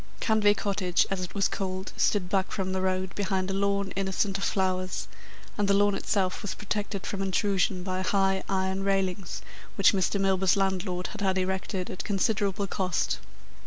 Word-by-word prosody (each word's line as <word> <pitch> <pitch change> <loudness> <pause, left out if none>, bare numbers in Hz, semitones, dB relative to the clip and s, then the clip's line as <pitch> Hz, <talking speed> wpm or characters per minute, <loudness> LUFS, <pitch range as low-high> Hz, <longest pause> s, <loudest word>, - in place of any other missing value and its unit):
Canvey 215 -3 +4
Cottage, 190 -4 +1
as 195 -1 -1
it 180 - -6
was 195 -1 +3
called, 190 0 -4
stood 200 -4 +2
back 190 0 0
from 190 -1 -2
the 190 - 0
road, 185 0 -1
behind 190 -2 -1
a - - -2
lawn, 200 0 0
innocent 195 +1 0
of - - -4
flowers, 185 -2 0 0.5
and 205 - +2
the 200 - +4
lawn 205 0 +4
itself 190 -2 0
was 205 - -4
protected 205 -1 -3
from 200 - -3
intrusion 195 -1 +1
by 185 0 -2
high 195 0 +2
iron 190 0 0
railings 195 -2 -1 0.3
which 195 - +5
Mr. 195 +1 +1
Milburgh's 190 -1 +3
landlord 185 -2 0
had 215 - -8
had 190 -1 +2
erected 190 0 -2
at 185 - -5
considerable 200 0 0
cost. 185 -2 -1
195 Hz, 170 wpm, -28 LUFS, 185-200 Hz, 0.5 s, which